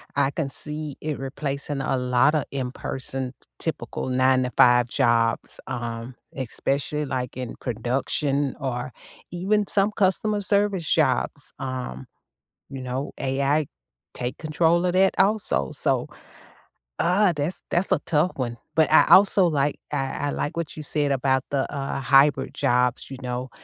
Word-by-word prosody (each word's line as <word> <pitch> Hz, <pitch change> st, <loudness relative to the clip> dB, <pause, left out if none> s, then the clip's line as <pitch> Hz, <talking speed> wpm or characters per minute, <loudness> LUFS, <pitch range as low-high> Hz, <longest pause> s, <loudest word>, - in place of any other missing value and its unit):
I 140 Hz, -1 st, +2 dB
can 145 Hz, -2 st, -2 dB
see 150 Hz, 0 st, -5 dB
it 155 Hz, -1 st, -3 dB
replacing 140 Hz, +1 st, -4 dB
a 135 Hz, -, 0 dB
lotta 125 Hz, +4 st, +2 dB
in 130 Hz, -3 st, -3 dB
person, 130 Hz, -1 st, -4 dB, 0.3 s
typical -, -, -3 dB
9-to-5 125 Hz, -1 st, +4 dB
jobs, 120 Hz, -3 st, +1 dB
um, 120 Hz, -1 st, -5 dB, 0.2 s
especially, 140 Hz, +3 st, -2 dB
like, 125 Hz, -2 st, -4 dB
in 125 Hz, -2 st, -5 dB
production 135 Hz, +4 st, -1 dB
or 130 Hz, -2 st, -3 dB, 0.4 s
even 200 Hz, +4 st, 0 dB
some 200 Hz, +1 st, +2 dB
customer 205 Hz, +1 st, +1 dB
service 200 Hz, -4 st, +1 dB
jobs, -, -, +1 dB
um, 130 Hz, -, -5 dB, 0.6 s
you 135 Hz, -1 st, -7 dB
know, 130 Hz, +2 st, -4 dB
AI 140 Hz, +3 st, +1 dB, 0.5 s
take 125 Hz, 0 st, -4 dB
control 165 Hz, +3 st, +2 dB
of 180 Hz, -, +1 dB
that 190 Hz, +1 st, +3 dB
also, 195 Hz, -, +1 dB
so -, -, 0 dB, 0.9 s
uh, 180 Hz, +2 st, +3 dB
that's 150 Hz, +4 st, -3 dB
that's 175 Hz, +3 st, +1 dB
a -, -, +4 dB
tough 160 Hz, +3 st, +2 dB
one. 120 Hz, -3 st, -3 dB, 0.2 s
But 160 Hz, -1 st, +3 dB
I -, -, +7 dB
also 190 Hz, -1 st, +6 dB
like 145 Hz, -3 st, 0 dB
I 140 Hz, 0 st, -2 dB
I -, -, 0 dB
like 145 Hz, -, -3 dB
what 165 Hz, -3 st, -4 dB
you 155 Hz, -, -5 dB
said 145 Hz, -1 st, +1 dB
about 130 Hz, -1 st, +1 dB
the, 135 Hz, -2 st, 0 dB
uh, 135 Hz, -1 st, -3 dB
hybrid 135 Hz, +1 st, +4 dB
jobs, 125 Hz, 0 st, +1 dB
you 135 Hz, -, -7 dB
know? 125 Hz, +1 st, -4 dB
140 Hz, 140 wpm, -24 LUFS, 130-155 Hz, 0.9 s, I